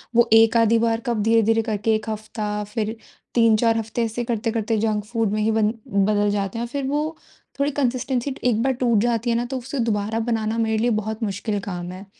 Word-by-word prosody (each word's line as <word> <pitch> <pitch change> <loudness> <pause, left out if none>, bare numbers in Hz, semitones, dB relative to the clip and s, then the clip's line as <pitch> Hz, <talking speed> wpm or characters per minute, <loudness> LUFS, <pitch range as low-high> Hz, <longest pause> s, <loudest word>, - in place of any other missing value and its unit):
वो 235 0 +5
एक 225 +1 +6
आधी 230 0 +4
बार 225 0 +1
कब 235 -3 0
धीरे-धीरे 225 0 +3
करके 220 0 0
1 215 0 -4
हफ्ता 210 -1 -4
फिर 220 0 -2 0.4
3-4 230 -1 +4
हफ्ते 225 +1 -2
ऐसे 230 +2 -3
करते 230 -1 -1
करते 225 0 -1
जंक 215 -1 0
फूड 225 -2 -1
में 215 0 0
ही 220 +1 +2
ब 220 0 +1 0.3
बदल 205 +1 +2
जाते 200 +1 -2
हैं। - - -2
और - - -7
फिर 280 -1 -2
वो 300 +3 -1 0.4
थोड़ी 285 +1 +1
कंसिस्टेन्सी 260 0 -1
एक 230 -3 +2
बार 265 0 +2
टूट 240 -3 +2
जाती 235 0 0
है 230 - +2
ना 240 +1 0
तो 260 +2 -4
उसे 270 +2 -5
दोबारा 210 +1 -1
बनाना 225 -1 -1
मेरे 220 -1 +1
लिए 235 +3 +1
बहुत 220 +2 -5
मुश्किल 205 0 -2
काम 180 -3 -5
है। 185 +2 -9
225 Hz, 215 wpm, -22 LUFS, 215-235 Hz, 0.4 s, एक